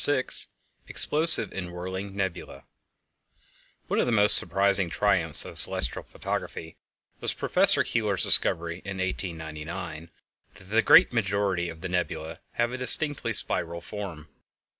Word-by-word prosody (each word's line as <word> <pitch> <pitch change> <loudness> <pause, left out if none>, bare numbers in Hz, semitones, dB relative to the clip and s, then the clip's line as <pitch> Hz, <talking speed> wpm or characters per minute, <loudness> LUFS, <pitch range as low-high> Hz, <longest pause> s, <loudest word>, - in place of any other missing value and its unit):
VI 145 -3 +2 0.6
Explosive 160 +2 0
and 90 -2 -7
Whirling 95 +3 -8
Nebulæ 95 -3 -6 1.2
One - - -3
of - - 0
the - - -1
most 105 -2 +6
surprising 95 +1 +2
triumphs - - +2
of - - +3
celestial 60 - +4
photography 80 0 -8 0.4
was - - +2
Professor - - +4
Keeler's 105 -5 -2
discovery, 85 +1 +3
in 100 0 -8
1899, 85 -2 -7 0.5
that - - -16
the 110 +4 0
great 170 +1 +4
majority 100 -5 -2
of 80 -1 -12
the 95 - -5
nebulæ 80 -2 -5
have 120 0 -2
a 130 - -7
distinctly 140 -1 0
spiral 85 -5 0
form. 85 -5 -9
95 Hz, 130 wpm, -25 LUFS, 85-105 Hz, 1.2 s, most